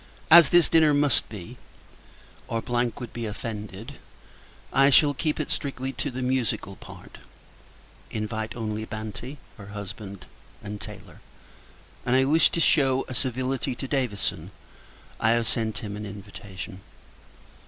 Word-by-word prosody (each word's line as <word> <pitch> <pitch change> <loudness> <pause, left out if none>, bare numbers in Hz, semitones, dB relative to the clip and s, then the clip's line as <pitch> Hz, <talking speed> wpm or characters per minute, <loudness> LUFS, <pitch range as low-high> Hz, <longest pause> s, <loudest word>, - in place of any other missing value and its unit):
As 165 -3 +10
this 175 -1 +6
dinner 155 -3 +5
must 145 -3 +3
be, 105 +3 -9 0.9
or 115 - -1
would 120 -1 -2
be 115 -1 -3
offended, 105 +3 -6 0.7
I 135 +1 +6
shall 145 +1 +6
keep 155 +2 -1
it 155 - -2
strictly 135 -1 -2
to 145 - -2
the 130 0 -4
musical 125 -6 -1
part; - - -13 0.9
invite 110 +1 -3
only 110 -2 -3
Banti, 110 +6 -6 0.2
her 100 - -9
husband, 100 -1 -8 0.4
and 105 0 -6
Taylor; 105 -4 -9 0.8
and, 125 - +2
as 130 - +6
I - - +2
wish 155 +4 +5
to - - +1
shew 135 -5 +3
a 130 - -6
civility 130 0 -1
to 135 - -5
Davison, 125 -8 -1 0.7
I 110 +1 +4
have 115 -1 -1
sent 110 -3 0
him 105 -1 -4
an 105 0 -5
invitation. 100 -1 -9
120 Hz, 140 wpm, -26 LUFS, 105-135 Hz, 0.9 s, As